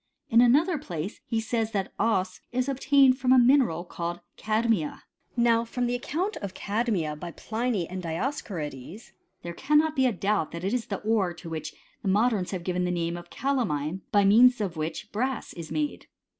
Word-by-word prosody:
In 230 +1 +7
another 295 +7 +4
place 175 - -6
he 225 - 0
says, 225 0 -1
that 195 -2 -2
cbs 190 -4 +1
is 255 +1 0
obtained 275 -1 +4
from 255 -1 +2
a 260 - +7
mineral 245 - +4
called 175 0 -4 0.2
cadmia. 215 -7 0 0.3
Now 235 -1 +4
from 245 +1 -2
the 240 - 0
account 340 - -2
of 200 -3 -6
cadmia 200 -8 -1
by 170 +3 -7
Pliny 220 +1 -2
and 185 +1 -5
Dioscorides, 170 - -5 0.3
there 170 - -5
cannot 300 - +2
be 265 -1 +3
a - - +2
doubt 200 -4 -1
that 170 +1 -6
it 195 +4 -1
is 245 -3 -1
th« 200 - -4
ore 205 -6 +1
to 165 -1 -9
which 155 -1 -5 0.3
the 195 - -1
modems 210 -1 +2
have 185 -3 -4
given 180 0 -1
the 180 - 0
name 170 -1 -1
of 175 0 -9
calamine, 190 - -1
by 205 -1 +4
means 245 +5 +6
of 195 -5 -2
which 160 +7 -4
brass 255 +4 -2
is 165 -2 -8
made. 300 -1 -2
215 Hz, 185 wpm, -27 LUFS, 175-250 Hz, 0.3 s, In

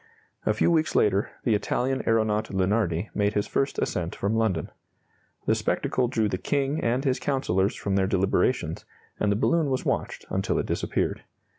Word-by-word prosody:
A - - +4
few - - +3
weeks 160 -2 +1
later, 100 -1 +3
the 115 - +2
Italian 130 +5 0
aeronaut 110 -1 +1
Lunardi 95 -1 0
made 105 0 0
his 105 - +1
first 135 - -1
ascent 85 -1 -2
from 100 +2 -1
London. 105 -8 0 0.7
The - - +3
spectacle 125 -1 0
drew 110 -3 +1
the 95 -3 -2
King 140 +1 0
and 125 +3 +1
his 130 -2 +1
councillors 100 -9 0
from 100 -1 -2
their 95 -1 +2
deliberations, 95 -2 +1 0.4
and 105 - +2
the - - +2
balloon 160 +7 +2
was 130 -1 -1
watched - - -2
until - - 0
it - - 0
disappeared. - - -1
110 Hz, 170 wpm, -26 LUFS, 95-130 Hz, 0.7 s, A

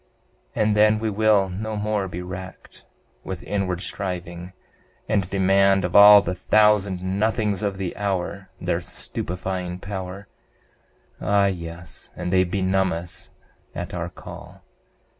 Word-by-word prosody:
And 105 -1 +2
then 105 +1 +5
we 110 0 -2
will 105 -1 +3
no 110 +4 -4
more 105 -1 -1
be 90 0 -6
racked 95 +1 -9 0.4
With 95 -2 -6
inward 95 -3 -2
striving, 90 -2 -5 0.5
and 95 -3 0
demand 95 0 +3
Of 90 - -4
all 105 0 +10
the 90 - -2
thousand 100 -1 +3
nothings 105 +1 0
of 100 -2 -2
the 95 -2 -4
hour 95 -1 -3
Their - - -1
stupefying 90 0 -5
power; 95 0 -6 0.9
Ah 100 0 +3
yes, 85 -3 -5
and 90 - -3
they 95 0 +5
benumb 95 +1 +1
us 85 +1 -6 0.5
at - - -5
our - - -3
call! - - -12
95 Hz, 130 wpm, -23 LUFS, 90-105 Hz, 0.9 s, all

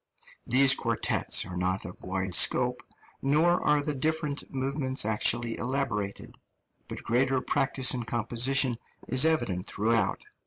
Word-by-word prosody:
These 130 +2 +5
quartets - - +1
are 90 - -8
not 95 +2 -2
of 90 - -10
wide 95 0 -4
scope, - - +3 0.4
nor 155 +6 +2
are 150 -1 +2
the 150 0 -3
different 150 +1 -2
movements 135 -1 -1
actually 115 +2 0
elaborated, 120 -6 -4 0.5
but - - -8
greater 130 +3 +1
practice 135 -1 +2
in 125 - -3
composition 120 +2 +1 0.3
is 130 +3 +3
evident 120 - 0
throughout. 110 -1 -1
130 Hz, 125 wpm, -27 LUFS, 110-140 Hz, 0.5 s, These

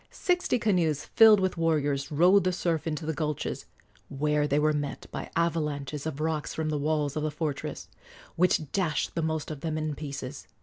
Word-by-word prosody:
Sixty 355 -8 0
canoes 175 - +1
filled 220 -2 +7
with 185 -2 0
warriors 145 -4 0
rode 180 +6 +5
the 185 - +1
surf 170 -3 -1
into 155 0 -3
the 160 - -1
gulches, 150 -2 -3 0.4
where 150 +1 +1
they 145 - +1
were 155 +1 +3
met 145 -1 -3
by - - -5
avalanches 150 -3 -1
of 150 -2 -5
rocks 155 -1 -2
from 160 -1 -1
the 150 -1 -1
walls 150 -1 0
of 155 - -1
the 155 - 0
fortress, 150 -1 -4 0.5
which 165 -4 +2
dashed 165 -7 0
the 165 - -1
most 160 -1 -2
of 145 -3 -7
them 155 -1 -2
in 155 -1 -2
pieces. 140 -2 -7
155 Hz, 185 wpm, -28 LUFS, 150-165 Hz, 0.5 s, filled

